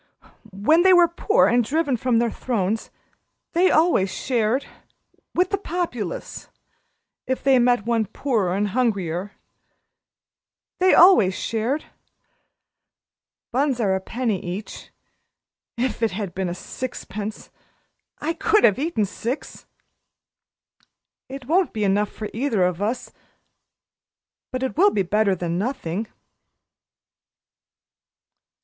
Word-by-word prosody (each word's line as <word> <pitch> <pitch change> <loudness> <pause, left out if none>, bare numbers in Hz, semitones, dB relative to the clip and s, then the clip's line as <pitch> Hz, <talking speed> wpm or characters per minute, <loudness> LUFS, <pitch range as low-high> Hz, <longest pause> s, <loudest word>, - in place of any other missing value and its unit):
When 220 - +3
they 375 +1 +6
were 350 -1 +6
poor 410 +7 +2
and 240 0 +3
driven 285 +2 0
from 245 0 +1
their 235 0 +1
thrones 220 -3 -2 0.6
they 360 +2 +4
always 310 - +3
shared 240 +3 0 0.7
with 360 +1 +2
the 400 - 0
Populace 320 - -4 0.8
if 260 - -2
they 270 -2 +5
met 245 -3 +2
one 230 -2 +1
poorer 215 -6 -1
and 205 +1 0
hungrier. 200 -5 -1 1.5
They 370 +1 +5
always 225 - +6
shared. 230 +7 -2 1.7
Buns 265 0 0
are 200 -4 +1
a 190 - -1
penny 225 -2 -2
each. 185 +4 -7 0.9
If 245 0 -2
it 225 - +2
had 195 -2 -4
been 185 -2 -2
sixpence! 215 0 -7 0.7
I 320 +3 -2
could 425 +5 +2
have 210 +2 +4
eaten 295 -8 0
six. 230 +7 -6 1.6
It 270 -1 -8
won't 350 +6 +1
be 215 - -2
enough 205 +1 +1
for 215 - -6
either 230 -5 0
of 180 0 0
us 225 +5 -2 1.4
but 255 0 -3
it 265 - -2
will 390 +6 +5
be 200 - 0
better 200 +1 +1
than 175 0 -3
nothing." 215 -4 -3
235 Hz, 115 wpm, -23 LUFS, 200-275 Hz, 1.7 s, they